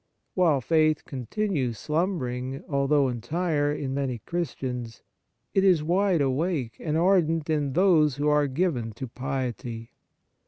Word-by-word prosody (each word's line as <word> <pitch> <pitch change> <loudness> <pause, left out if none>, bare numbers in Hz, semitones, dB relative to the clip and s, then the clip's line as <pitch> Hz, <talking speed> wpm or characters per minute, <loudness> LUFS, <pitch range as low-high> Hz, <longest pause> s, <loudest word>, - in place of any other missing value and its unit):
While 165 -7 +3
faith 155 +2 +2
continues 135 - -2
slumbering, 135 -6 -2
although 140 0 +2
entire, 145 +5 -1
in 140 -3 -3
many 135 -3 -2
Christians, 125 -5 -4 0.5
it 195 - +3
is 180 -6 +4
wide 180 0 +2
awake 140 -2 -1
and 155 -1 -1
ardent 165 -3 +2
in 145 -3 0
those 160 -6 +4
who 145 +1 -1
are 150 -1 +3
given 130 -6 -1
to 130 - -6
piety. 125 -3 -4
145 Hz, 125 wpm, -26 LUFS, 130-170 Hz, 0.5 s, is